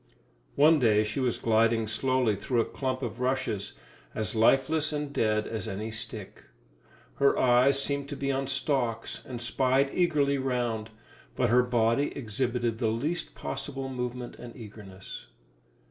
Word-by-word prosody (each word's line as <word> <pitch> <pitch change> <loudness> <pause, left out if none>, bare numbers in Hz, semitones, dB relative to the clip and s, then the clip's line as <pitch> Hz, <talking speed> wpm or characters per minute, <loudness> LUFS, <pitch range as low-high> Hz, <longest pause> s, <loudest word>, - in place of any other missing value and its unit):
One 155 +2 +6
day 110 -4 +4
she 105 +4 -3
was 125 -3 +1
gliding 115 0 +2
slowly 125 0 +1
through 120 +5 -1
a 115 - +3
clump 130 -1 -3
of 120 0 -4
rushes, 125 -6 -1 0.4
as 110 -1 -1
lifeless 135 +7 +3
and 145 -1 -3
dead 110 -3 +1
as 110 0 -4
any 110 +2 -4
stick. 110 -2 -7 0.7
Her 140 0 +3
eyes 130 +2 +4
seemed 140 0 -2
to 145 - -4
be 140 0 -1
on 135 0 -1
stalks 130 -4 -1
and 125 -2 -6
spied 130 +3 +2
eagerly 145 -6 +2
round, 120 -4 -1 0.5
but - - +1
her 125 +1 +6
body 120 +2 +1
exhibited 120 -1 -1
the 115 - +1
least 140 +11 -2
possible 135 -2 -5
movement 125 -1 -5
and 120 -1 -10
eagerness. 100 -4 -10
125 Hz, 145 wpm, -28 LUFS, 110-135 Hz, 0.7 s, One